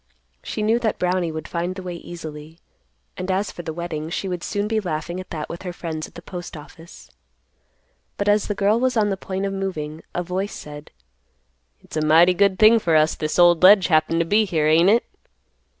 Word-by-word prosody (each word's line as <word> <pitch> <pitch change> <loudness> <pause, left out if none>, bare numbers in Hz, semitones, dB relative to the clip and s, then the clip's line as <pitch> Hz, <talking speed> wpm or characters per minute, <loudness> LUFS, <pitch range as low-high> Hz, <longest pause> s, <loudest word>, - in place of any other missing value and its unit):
She 215 - -4
knew 225 +3 +2
that 225 -3 -1
Brownie 180 -2 0
would 155 0 -6
find 175 +2 -3
the 190 - -7
way 180 -1 -5
easily, 160 -2 -9 0.6
and, 185 +1 -5
as 190 +1 0
for - - -8
the 165 -1 -5
wetting, 160 -2 -5
she 195 - -3
would 180 -2 -4
soon 205 +2 -2
be 220 0 0
laughing 175 -1 -4
at 185 - -9
that 155 -2 -5
with 170 - -8
her 180 - -5
friends 160 -2 -5
at - - -21
the 170 - -10
Postoffice. 170 -2 -10 1.1
But, 200 - -2
as 205 0 +3
the 205 - -2
girl 205 +3 +2
was 255 -1 0
on 210 -1 +2
the 195 - 0
point 190 0 -4
of 195 - -2
moving, 160 -5 -4
a 175 - -1
voice 185 +3 -3
said, 150 0 -10 0.9
"It's - - -8
a 155 - 0
mighty 165 +4 +5
good 195 0 +2
thing 220 +2 +6
for 170 -6 +1
us 155 0 +4
this 155 0 -3
old 175 -2 +5
ledge 190 -1 +7
happened 165 +1 +2
to - - 0
be 210 +6 +3
here, 160 -6 0
ain't 165 +4 +5
it?" 230 +3 +3
175 Hz, 215 wpm, -22 LUFS, 160-195 Hz, 1.1 s, ledge